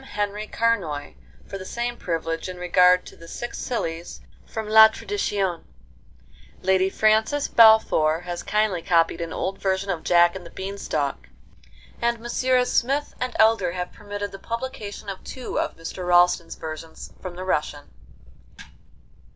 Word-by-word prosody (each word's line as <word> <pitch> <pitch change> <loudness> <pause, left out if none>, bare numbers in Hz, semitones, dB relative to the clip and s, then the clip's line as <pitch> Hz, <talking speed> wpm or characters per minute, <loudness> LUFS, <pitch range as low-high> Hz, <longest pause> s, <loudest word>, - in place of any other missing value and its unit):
Henri 210 -3 -3
Carnoy 185 -13 -1 0.3
for 195 - -7
the - - -7
same 240 +5 -3
privilege 165 -3 -3
in 180 - -7
regard 180 0 +4
to - - -12
'The 165 - -14
Six 240 +7 -6
Sillies' 170 -9 -4 0.3
from 220 -1 -5
La 220 0 +9
Tradition. 205 - -2 1.0
Lady 190 0 +3
Frances 220 +8 +2
Balfour 220 -8 +5
has 175 -1 -5
kindly 210 -4 0
copied 165 -1 +2
an 165 -1 -4
old 195 +3 -3
version 190 0 -1
of 170 -3 -3
'Jack 175 0 +4
and 190 - -7
the 170 - -11
Beanstalk,' 190 -8 -4 0.7
and 235 0 +1
Messrs. 250 +2 +1
Smith 275 +4 0
and 255 -1 -2
Elder 220 -6 +3
have 180 0 -5
permitted 205 0 -6
the 195 - -9
publication 230 -4 -6
of 195 -1 -6
two 255 -2 -5
of - - -3
Mr. 170 +2 -6
Ralston's 175 -1 +3
versions 160 0 -8
from 180 -2 -7
the 185 - -6
Russian. 150 -4 -2
190 Hz, 145 wpm, -24 LUFS, 175-220 Hz, 1.0 s, La